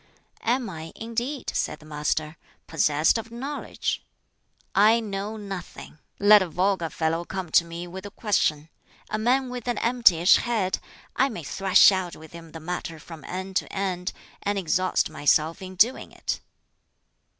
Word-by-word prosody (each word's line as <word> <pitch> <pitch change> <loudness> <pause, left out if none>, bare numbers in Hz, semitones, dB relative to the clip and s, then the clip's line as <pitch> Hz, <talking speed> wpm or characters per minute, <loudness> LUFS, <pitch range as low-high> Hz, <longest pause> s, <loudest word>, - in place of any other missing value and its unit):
'" - - -32
"Am 255 -3 -4
I, 165 -3 -7
indeed," 235 +5 -3
said - - -1
the 155 - -17
Master, 150 +1 -2 0.3
"possessed 155 +4 +2
of 225 - -8
knowledge? 265 +5 -4 0.7
I 215 +3 +5
know 210 0 -4
nothing. 195 -6 -8 0.2
Let 205 +1 +7
a 185 - -2
vulgar 185 -1 0
fellow 165 +1 -1
come 185 -2 -5
to 170 - +6
me 170 +1 -6
with 190 +3 -8
a - - -8
question 160 -8 0 0.4
a 215 - -1
man 255 +3 +2
with 250 -1 -6
an 245 - 0
emptyish 220 -8 +5
head 215 -6 0 0.4
I 270 +2 +3
may 180 -10 -6
thrash 190 +8 +5
out 185 -2 -2
with 160 0 -13
him 165 -1 -11
the 160 - -8
matter 165 0 -5
from 160 +1 -11
end 190 +1 -3
to - - -2
end, 185 -2 -2 0.3
and 205 0 -1
exhaust 185 0 +1
myself 155 +3 +2
in 185 0 -8
doing 235 +8 +2
it!" - - -3
190 Hz, 160 wpm, -25 LUFS, 165-220 Hz, 0.7 s, Let